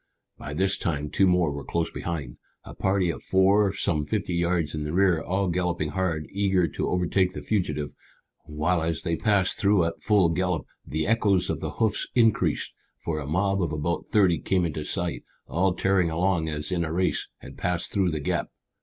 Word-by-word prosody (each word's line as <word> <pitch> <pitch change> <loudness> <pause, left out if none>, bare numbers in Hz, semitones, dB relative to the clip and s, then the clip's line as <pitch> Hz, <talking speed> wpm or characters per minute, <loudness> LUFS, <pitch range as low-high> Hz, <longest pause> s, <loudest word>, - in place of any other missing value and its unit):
By 75 - -7
this 95 +3 +1
time 75 -3 -2
two 95 - +3
more 90 -4 +3
were 70 0 -5
close 85 +3 -2
behind, 75 -8 -5 0.3
a - - -10
party 95 -2 +1
of - - -8
four 95 +1 +3
some 80 -5 0
fifty 100 +2 -2
yards 85 -3 0
in 75 -1 -3
the 75 +1 -4
rear, 95 -4 +3
all 95 +2 -1
galloping 90 -3 -1
hard, 85 -3 -1
eager 95 -3 +2
to - - -2
overtake 90 +1 +1
the - - -7
fugitive, 75 -8 -1 0.6
while 80 +3 0
as 80 0 -2
they 85 -2 0
passed 100 0 +1
through 100 -2 +4
at 85 - -4
full 100 -5 +3
gallop 90 -1 -1 0.2
the 80 +1 -2
echoes 105 -4 +2
of - - -3
the - - -4
hoofs 110 -2 0
increased, 115 -3 +2 0.2
for 80 -2 -3
a 70 - -6
mob 95 +5 +1
of 85 -3 -1
about 80 +2 -2
thirty 95 -6 +4
came 90 +2 +1
into 75 -2 -3
sight, - - -2 0.2
all 90 +2 +1
tearing 95 -3 +2
along 85 -1 0
as 75 +2 -3
in 85 -2 0
a 80 - -3
race, 90 +2 0
and - - -11
passed 90 -1 -2
through 95 -3 +2
the 80 -2 -2
gap. 70 - -1
90 Hz, 195 wpm, -26 LUFS, 80-95 Hz, 0.6 s, through